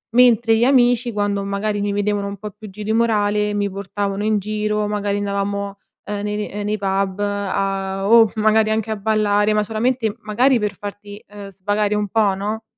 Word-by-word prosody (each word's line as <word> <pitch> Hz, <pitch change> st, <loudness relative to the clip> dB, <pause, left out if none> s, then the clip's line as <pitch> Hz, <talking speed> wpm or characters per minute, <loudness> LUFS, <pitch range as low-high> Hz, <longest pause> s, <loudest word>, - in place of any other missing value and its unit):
Mentre 235 Hz, -2 st, +5 dB
gli 225 Hz, -, +2 dB
amici, 245 Hz, -2 st, +3 dB
quando 205 Hz, -1 st, -1 dB
magari 200 Hz, +1 st, -2 dB
mi 205 Hz, 0 st, -1 dB
vedevano 205 Hz, 0 st, -1 dB
un 200 Hz, 0 st, -6 dB
po' 210 Hz, +2 st, -7 dB
più 210 Hz, +1 st, -12 dB
giù 210 Hz, +2 st, -8 dB
di 220 Hz, +1 st, -1 dB
morale, 210 Hz, -2 st, +1 dB
mi 205 Hz, 0 st, 0 dB
portavano 200 Hz, +1 st, -3 dB
in 215 Hz, -1 st, +2 dB
giro. 210 Hz, +1 st, -1 dB
Magari 205 Hz, -1 st, -1 dB
andavamo, 200 Hz, 0 st, -3 dB, 0.3 s
uhm, 205 Hz, -1 st, -4 dB
nei 210 Hz, 0 st, -2 dB
ne 210 Hz, -, -4 dB
ehm, 205 Hz, +1 st, -4 dB
nei 210 Hz, +1 st, -1 dB
pub 195 Hz, -1 st, -1 dB
a 195 Hz, -1 st, -2 dB
o 225 Hz, -1 st, +6 dB
magari, 215 Hz, 0 st, +3 dB
anche 220 Hz, 0 st, -1 dB
a -, -, 0 dB
ballare. 210 Hz, 0 st, +1 dB
Ma 210 Hz, 0 st, +2 dB
solamente, 225 Hz, +1 st, -1 dB
magari 245 Hz, +5 st, +2 dB
per 210 Hz, -2 st, -2 dB
farti, 205 Hz, 0 st, -8 dB
uhm, 200 Hz, -1 st, -8 dB
svagare 205 Hz, +2 st, -1 dB
un 210 Hz, 0 st, -1 dB
po', 205 Hz, -1 st, +2 dB
no, 210 Hz, +3 st, -4 dB
205 Hz, 195 wpm, -20 LUFS, 200-215 Hz, 0.3 s, o